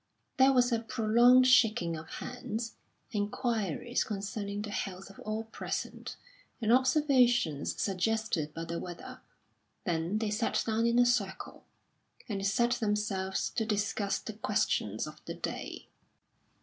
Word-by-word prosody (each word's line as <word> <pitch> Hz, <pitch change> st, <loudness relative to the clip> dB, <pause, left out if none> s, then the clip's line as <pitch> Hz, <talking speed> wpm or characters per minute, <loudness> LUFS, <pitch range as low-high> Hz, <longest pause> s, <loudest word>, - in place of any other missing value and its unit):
There 265 Hz, 0 st, +6 dB
was 250 Hz, -1 st, +3 dB
a 230 Hz, -, +2 dB
prolonged 240 Hz, +2 st, +5 dB
shaking 220 Hz, -9 st, +4 dB
of 160 Hz, 0 st, -8 dB
hands, 235 Hz, -2 st, -5 dB, 0.4 s
inquiries 220 Hz, -, -1 dB
concerning 200 Hz, 0 st, -4 dB
the 210 Hz, -, -5 dB
health 195 Hz, -1 st, -4 dB
of 195 Hz, -, -17 dB
all 215 Hz, +1 st, -3 dB
present, 225 Hz, -, -5 dB, 0.4 s
and 225 Hz, -1 st, +2 dB
observations 250 Hz, -, +3 dB
suggested 195 Hz, -5 st, 0 dB
by 165 Hz, +2 st, -5 dB
the 170 Hz, 0 st, -4 dB
weather; 175 Hz, -1 st, -8 dB, 0.6 s
then 170 Hz, +3 st, -1 dB
they 215 Hz, -1 st, -1 dB
sat 220 Hz, +2 st, 0 dB
down 225 Hz, +1 st, +1 dB
in 235 Hz, 0 st, +2 dB
a 245 Hz, -, +6 dB
circle, 205 Hz, -6 st, -1 dB, 0.6 s
and 200 Hz, -3 st, -3 dB
set 235 Hz, +5 st, +2 dB
themselves 205 Hz, -4 st, -1 dB
to 225 Hz, -, -1 dB
discuss 205 Hz, -1 st, 0 dB
the 220 Hz, -, -7 dB
questions 205 Hz, -, 0 dB
of 155 Hz, 0 st, -11 dB
the -, -, -5 dB
day. -, -, -5 dB
215 Hz, 135 wpm, -31 LUFS, 195-235 Hz, 0.6 s, There